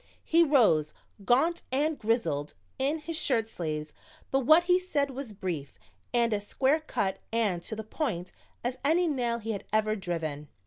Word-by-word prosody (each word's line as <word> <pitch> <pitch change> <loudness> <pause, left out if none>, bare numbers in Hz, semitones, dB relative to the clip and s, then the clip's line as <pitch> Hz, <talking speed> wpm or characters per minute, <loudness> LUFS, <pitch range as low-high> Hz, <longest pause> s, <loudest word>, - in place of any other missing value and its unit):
He 335 +1 +4
rose, 215 - +3 0.3
gaunt 320 - +3
and 295 +3 +1
grizzled 170 - 0 0.2
in 280 +4 +1
his 330 +2 -4
shirt 235 -7 +1
sleeves, 155 -6 -4 0.4
but 270 - +3
what 315 +6 +6
he 360 +1 +4
said 295 -7 -1
was 265 -3 -6
brief 175 -8 -5 0.3
and 235 -2 +2
as 205 0 -2
square 275 +4 +2
cut 195 -11 -2
and 215 -6 +1
to 220 - -5
the 220 - -5
point 215 - -3 0.3
as 245 +2 -2
any 335 +5 +3
nail 245 -6 0
he 225 -1 -4
had 200 - -5
ever 215 0 +2
driven. 165 -6 -4
230 Hz, 170 wpm, -29 LUFS, 190-285 Hz, 0.4 s, what